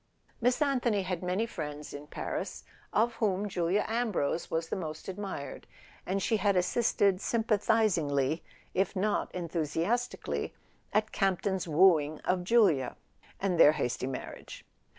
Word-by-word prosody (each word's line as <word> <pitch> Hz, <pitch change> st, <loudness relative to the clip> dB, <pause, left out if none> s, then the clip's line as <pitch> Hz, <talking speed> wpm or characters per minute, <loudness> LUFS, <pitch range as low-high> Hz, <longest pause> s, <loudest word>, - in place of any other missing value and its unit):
Miss 250 Hz, +5 st, +3 dB
Anthony 245 Hz, -8 st, +1 dB
had 185 Hz, -2 st, -3 dB
many 185 Hz, +5 st, 0 dB
friends 150 Hz, -8 st, -6 dB
in 145 Hz, +1 st, -8 dB
Paris, -, -, -4 dB, 0.3 s
of 230 Hz, +2 st, +2 dB
whom 205 Hz, -2 st, +1 dB
Julia 180 Hz, +1 st, 0 dB
Ambrose 220 Hz, -9 st, -1 dB
was 165 Hz, 0 st, -2 dB
the -, -, -1 dB
most 155 Hz, -4 st, -6 dB
admired; 190 Hz, -8 st, -6 dB, 0.4 s
and 195 Hz, +1 st, 0 dB
she 220 Hz, -, +2 dB
had 200 Hz, -1 st, +2 dB
assisted 195 Hz, 0 st, +2 dB
sympathizingly 205 Hz, -, +1 dB, 0.3 s
(if 190 Hz, +1 st, 0 dB
not 205 Hz, +2 st, 0 dB
enthusiastically) 170 Hz, +8 st, -2 dB, 0.4 s
at 215 Hz, 0 st, +1 dB
Campton's 190 Hz, -1 st, 0 dB
wooing 155 Hz, -2 st, +4 dB
of 180 Hz, 0 st, 0 dB
Julia, 185 Hz, -, +3 dB, 0.4 s
and 185 Hz, -4 st, 0 dB
their 150 Hz, -2 st, +8 dB
hasty 130 Hz, -3 st, -2 dB
marriage. 135 Hz, -, -7 dB
185 Hz, 130 wpm, -30 LUFS, 160-215 Hz, 0.4 s, their